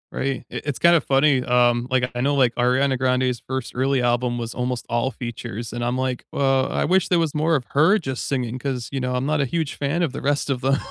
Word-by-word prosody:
Right, 135 -2 -2
I - - -4
it's 145 -3 -2
kinda 170 0 +5
funny, 135 -1 +3
um, 120 -1 +2
like, 130 -1 +1
I - - -2
know, 140 +3 +1
like, 130 -3 +3
Ariana 130 +2 +2
Grande's 125 -1 +1
first 130 -2 -3
early 135 +1 +1
album 120 0 0
was 115 -1 -4
almost 125 -1 -3
all 120 +2 0
features, 120 -2 -6
and 120 +1 -3
I'm 120 +1 -1
like, 130 -1 -2
"Well, 135 -1 +2
I - - 0
wish 185 +3 +2
there 180 - +2
was 160 -3 0
more 155 +2 +1
of 135 - 0
her 160 +9 +4
just 135 - -4
singing," 125 -2 -2
'cause, 125 -3 -4
you 135 - -2
know, 125 0 -2
I'm 125 +1 -1
not 150 +1 0
a 140 - +2
huge 155 +3 -2
fan 145 +5 -1
of 160 - 0
the - - -6
rest 145 0 0
of 135 -2 0
them. 135 +2 +2
130 Hz, 250 wpm, -22 LUFS, 125-140 Hz, -, kinda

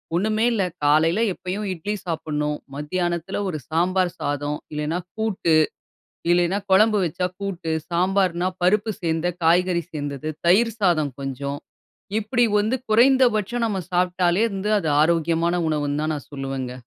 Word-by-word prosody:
ஒண்ணுமே 215 +5 +1
இல்ல 215 -4 +1 0.2
காலையில 155 +6 +3
எப்பயும் 190 +4 -4
இட்லி 195 +5 -4
சாப்புட்ணும். 150 -3 -2 0.2
மத்தியானத்துல 175 +5 -2
ஒரு 155 - -3
சாம்பார் 180 +2 +1
சாதம் 145 +1 -2 0.2
இல்லன்னா, 150 +4 -2 0.2
கூட்டு 215 -7 0 0.8
இல்லேன்னா 175 +2 +3
குழம்பு 215 +2 +5
வச்சா 175 +2 -1
கூட்டு, 180 -5 -3 0.2
சாம்பார்ன்னா, 185 0 +1
பருப்பு 210 +4 +2
சேர்ந்த 165 0 0 0.2
காய்கறி 175 +1 +3
சேர்ந்தது. 145 0 -4 0.2
தயிர் 230 +6 +4
சாதம் 155 -7 +2
கொஞ்சம். 140 +1 -4 0.6
இப்பிடி 240 +3 +2
வந்து 215 +5 +1
குறைந்தபட்சம் 240 -1 +3
நம்ம 205 -3 -2
சாப்டாலே 180 +2 +2
வந்து 195 +2 -2
அது 160 - -2
ஆரோக்கியமான 165 +1 +1
உணவுன்தான் 150 +1 -1
நான் 145 - -8
சொல்லுவங்க. 135 -2 -4
175 Hz, 125 wpm, -23 LUFS, 155-200 Hz, 0.8 s, குழம்பு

